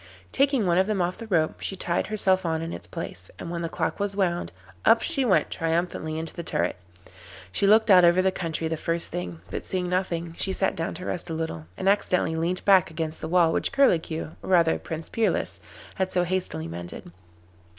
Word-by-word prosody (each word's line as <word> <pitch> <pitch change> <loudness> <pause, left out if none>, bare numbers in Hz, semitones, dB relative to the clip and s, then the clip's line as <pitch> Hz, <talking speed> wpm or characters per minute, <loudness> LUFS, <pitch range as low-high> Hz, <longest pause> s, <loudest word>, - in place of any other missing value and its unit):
Taking 275 -5 +2
one 175 0 +3
of 190 - +2
them 215 -2 0
off 180 +1 -1
the 230 - -7
rope, 160 -6 +1
she 195 - -2
tied 175 -2 -1
herself 190 -3 +2
on 160 -1 -1
in 165 - -5
its 85 - -4
place, 90 0 -7
and 170 - -6
when 170 -1 -3
the 165 - -2
clock 160 -1 -2
was 200 -1 -1
wound, 175 - 0 0.3
up 230 - +5
she 310 -5 +1
went 225 -7 +2
triumphantly 165 -1 -1
into 160 0 -3
the 170 - -5
turret. 90 - -1 0.8
She 200 - +1
looked 215 +1 +5
out 180 -1 +8
over 175 +1 +5
the 190 0 +3
country 165 -3 -3
the 160 0 -2
first 165 +2 -2
thing, 90 -2 -5
but - - -4
seeing 180 -1 -2
nothing 170 -2 -1
she 190 - 0
sat - - +1
down 165 0 -3
to 180 +2 -7
rest 175 - -3
a 165 - -3
little, 85 - -4
and 190 - -2
accidentally 185 -4 +2
leant 170 +3 -1
back 190 -4 +5
against 160 -1 -4
the - - -3
wall 165 -1 +3
which - - 0
Curlicue, 170 - +2
or - - -8
rather 170 -3 +4
Prince 160 0 -5
Peerless, 225 -1 0 0.3
had 190 -1 -2
so 180 - +2
hastily 175 - -2
mended. 85 +1 -8
175 Hz, 210 wpm, -26 LUFS, 160-190 Hz, 0.8 s, out